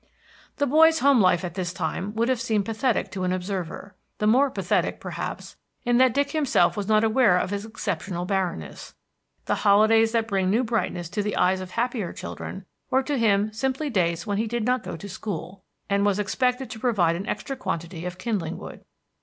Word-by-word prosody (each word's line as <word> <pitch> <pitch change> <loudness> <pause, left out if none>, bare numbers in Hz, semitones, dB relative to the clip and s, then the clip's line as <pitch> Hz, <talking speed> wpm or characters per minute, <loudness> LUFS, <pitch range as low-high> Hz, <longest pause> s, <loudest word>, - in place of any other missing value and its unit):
The 285 - +2
boy's 320 +4 +5
home 275 -3 +5
life 185 -1 +3
at 175 - -5
this 180 -2 -3
time 195 +2 -3
would 230 +1 +1
have 255 -3 0
seemed 215 -4 0
pathetic 225 +2 0
to 190 -2 -4
an 180 - 0
observer, 185 +1 -4 0.2
the 210 - -1
more 260 +6 +4
pathetic, - - -1
perhaps, - - -6 0.3
in 240 -1 +2
that 255 -1 +4
Dick 280 0 +1
himself 305 -4 +2
was 205 -2 -3
not 215 0 +4
aware 220 -4 +4
of 185 - -1
its 205 +1 -3
exceptional 190 -5 -4
barrenness. 185 - -3 0.5
The - - 0
holidays 220 +2 +5
that 225 -1 +1
bring 195 -3 0
new 225 +6 +2
brightness 220 -7 -2
to 210 +4 -2
the 205 0 -2
eyes 185 +1 +2
of 185 - -7
happier 230 -5 -1
children 190 0 -7 0.2
were 265 +1 +2
to 280 -1 -1
him 210 -1 +2
simply 265 +5 -2
days 170 -4 0
when 205 -1 -1
he 225 - 0
did 235 0 -2
not 250 0 +1
go - - -6
to 200 - -8
school, 190 -2 -6 0.2
and 200 0 +1
was 205 -1 +2
expected 250 +4 0
to 220 - -7
provide 200 -9 +2
an 190 +4 -5
extra 270 - -3
quantity 170 -7 -4
of 180 0 -6
kindling 185 -6 -2
wood. - - -10
210 Hz, 200 wpm, -25 LUFS, 185-240 Hz, 0.5 s, boy's